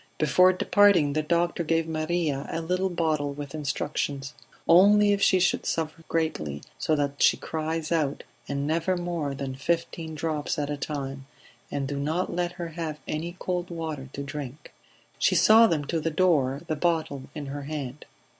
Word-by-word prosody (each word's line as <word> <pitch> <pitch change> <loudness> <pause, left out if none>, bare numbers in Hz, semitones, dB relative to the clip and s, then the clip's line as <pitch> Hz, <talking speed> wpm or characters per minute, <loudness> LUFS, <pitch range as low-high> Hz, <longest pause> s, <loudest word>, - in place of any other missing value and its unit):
Before 180 +5 +5
departing 185 -5 +4
the 155 - +1
doctor 170 +2 0
gave 165 0 +1
Maria 155 -3 -1
a - - -2
little 180 +3 0
bottle 155 -5 0
with 145 0 -7
instructions. 140 -2 -3 0.3
"Only 205 +4 +6
if 200 - -1
she 190 -1 +5
should 180 - +2
suffer 165 0 -2
greatly, 75 - -2 0.2
so 155 - +1
that 145 -1 -2
she - - +5
cries 160 0 -3
out, 150 -4 0 0.2
and 140 0 -2
never 165 +4 0
more 170 -5 -2
than 135 -1 -4
fifteen 160 +2 -2
drops 155 -1 -2
at 145 -1 -2
a - - -1
time. 135 -2 -5 0.4
And 140 -1 -2
do 140 0 -3
not 160 +6 -1
let 175 0 -1
her 175 -2 -5
have 160 -2 -4
any 170 +3 -3
cold 180 -1 -2
water 160 -5 -5
to 140 - -4
drink." 145 0 -7 0.5
She - - +3
saw 225 +1 +7
them 155 -6 0
to 165 +3 -1
the 165 - -1
door, 150 -5 +2
the 155 - -2
bottle 155 -4 -1
in 150 -2 -5
her 140 +1 -5
hand. 145 -2 -5
155 Hz, 175 wpm, -26 LUFS, 145-170 Hz, 0.5 s, saw